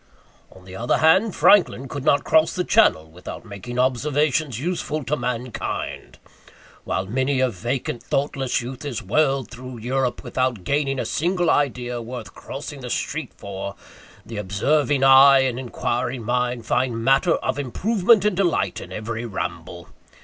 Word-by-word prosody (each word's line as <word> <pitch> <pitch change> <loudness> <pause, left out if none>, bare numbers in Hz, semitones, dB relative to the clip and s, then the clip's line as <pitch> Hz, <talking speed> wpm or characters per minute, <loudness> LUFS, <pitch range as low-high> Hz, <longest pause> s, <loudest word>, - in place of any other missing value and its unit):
On 95 -1 -16
the 95 0 -10
other 120 +5 0
hand, 190 +6 +4
Franklin 175 -9 +4
could 145 -2 -6
not 140 -1 +3
cross 160 0 +3
the 180 - 0
Channel 80 - +3
without 90 +6 -9
making 110 +4 -8
observations 135 +1 +1
useful 155 -1 -2
to 140 +4 -1
mankind. 125 -4 -4 0.7
While 95 - -1
many 130 +6 0
a 130 -1 +2
vacant 120 +4 -3
thoughtless 135 -3 -1
youth 130 +3 -7
is 140 -6 -4
whirled 135 +4 +1
through 125 0 -9
Europe 125 +2 -2
without 130 -6 -1
gaining 140 +1 0
a - - -2
single 175 +1 +1
idea 125 -4 0
worth 115 -5 -8
crossing 145 0 -8
the 125 - -6
street 150 +5 -3
for, 100 0 -6 0.5
the 115 - -8
observing 135 +8 +1
eye 135 0 +8
and 130 -2 -1
inquiring 125 -1 -3
mind 125 0 -1
find 120 -1 0
matter 135 +7 +3
of - - -2
improvement 200 - +2
and 210 -3 +2
delight 175 -3 0
in - - -10
every 110 +2 -4
ramble. 85 -4 -6
130 Hz, 150 wpm, -22 LUFS, 120-145 Hz, 0.7 s, eye